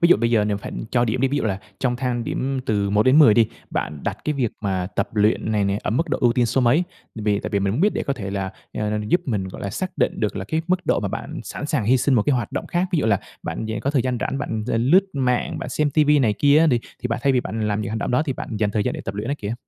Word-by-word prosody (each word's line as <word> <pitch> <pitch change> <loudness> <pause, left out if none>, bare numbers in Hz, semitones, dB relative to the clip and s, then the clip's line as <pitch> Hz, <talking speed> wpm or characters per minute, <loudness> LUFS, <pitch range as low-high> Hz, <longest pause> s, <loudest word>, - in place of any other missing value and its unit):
ví 170 - +5
dụ - - +7
bây 115 0 0
giờ 110 -3 +3
nếu 105 -1 0
phải 100 - -7 0.2
cho 120 -1 +3
điểm 120 +2 -1
đi, 135 - +3
ví 140 - -1
dụ - - -2
là 95 -3 -1 0.2
trong 125 -2 0
thang 125 -2 -2
điểm 135 +2 -2
từ 100 -2 +1
1-10 120 +4 +6
đi, 115 0 +5 0.2
bạn 75 -1 -3
đặt - - -2
cái 150 - +1
việc 130 -6 0
mà 95 -3 -1
tập - - 0
luyện 105 +1 +2
này 105 -2 +2
nè 100 +1 0
ở - - -1
mức 160 +10 0
độ - - 0
ưu 120 -1 +4
tiên 120 0 +2
số 130 - +1
mấy? 130 +8 +3 0.3
Tại 110 - -5
vì 105 -1 +2
tại - - -5
vì 100 - +1
mình 100 0 0
muốn 120 - -1
biết 205 +4 +4
để - - -1
có 140 - -1
thể 100 -7 -5
là, 95 -1 -2 0.2
à, 105 0 -1
giúp 175 - +3
mình, 100 -7 -1
gọi - - -9
là, 100 - -3
xác 185 - -3
định - - +1
được 105 -3 -1
là 95 - -3
cái 160 +10 -1
mức 185 0 0
độ - - +2
mà - - -2
bạn - - -5
sẵn 145 - -5
sàng 150 -7 0
hi 125 +5 +4
sinh 130 +2 +2
một 115 - +4
cái 145 - +2
hoạt 120 -4 -2
động - - -3
khác, 175 +2 0
ví 170 - +2
dụ 130 - +1
là 100 -3 +2 0.2
bạn 110 - -4
dạng 110 - -3
có 140 - 0
thời 140 -4 +2
gian 125 -2 -1
rảnh 135 - -2
bạn 110 -6 -3
l - - -2
l - - +2
lướt 190 +4 +6
mạng, 125 -3 0
bạn - - -5
xem 150 -1 0
ti 155 +2 +3
vi 150 0 +4
này 115 -6 +3
kia 145 +7 +4
á 165 - +5
đi 125 -6 +3 0.2
thì 125 - -1
bạn 115 0 -1
thay 140 - +3
vì 125 - +3
bạn 110 -1 -3
làm 105 0 0
những 105 - -3
hành 110 - -2
động - - -2
đó 125 +5 +3
thì 150 -4 -2
bạn 115 -3 -6
dành 105 -1 +1
thời 105 0 0
gian - - -1
để - - -5
tập 95 - -4
luyện 105 +3 -4
á 140 - 0
kìa. 105 +2 -3
120 Hz, 335 wpm, -22 LUFS, 105-140 Hz, 0.3 s, dụ